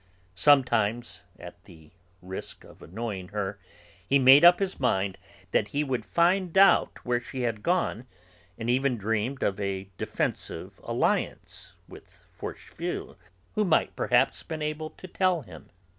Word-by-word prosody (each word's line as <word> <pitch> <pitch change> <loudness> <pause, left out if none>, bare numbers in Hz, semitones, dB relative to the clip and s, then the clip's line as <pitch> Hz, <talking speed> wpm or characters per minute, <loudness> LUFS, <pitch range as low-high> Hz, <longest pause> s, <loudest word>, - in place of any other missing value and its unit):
Sometime... 120 -1 +3 0.3
at - - -12
the 80 -2 -16 0.3
risk 95 +1 -8
of - - -17
annoying 100 0 -6
her, 105 0 -4 0.5
he 140 - +5
made 135 +2 +7
up 175 +1 +9
his 195 -1 -3
mind 100 -7 0 0.3
that - - +2
he 145 +5 -1
would 130 -4 -3
find 180 +1 +2
out 195 +1 +4
where 120 -1 +1
she 125 +2 -7
had 115 -3 -2
gone, 170 - -1 0.5
and 115 - -5
even 130 +1 +1
dreamed 115 +5 -2
of 100 0 0
a 100 -1 -4
defensive - - -4
alliance - - -2
with - - -16
Forcheville, - - -6 0.4
who 215 - +1
might 175 -6 +1
perhaps 125 +2 +2
have - - -15
been 160 -2 -4
able 155 +1 -3
to 185 - -12
tell 180 -3 +1
him. 90 -7 -13
125 Hz, 145 wpm, -27 LUFS, 105-155 Hz, 0.5 s, up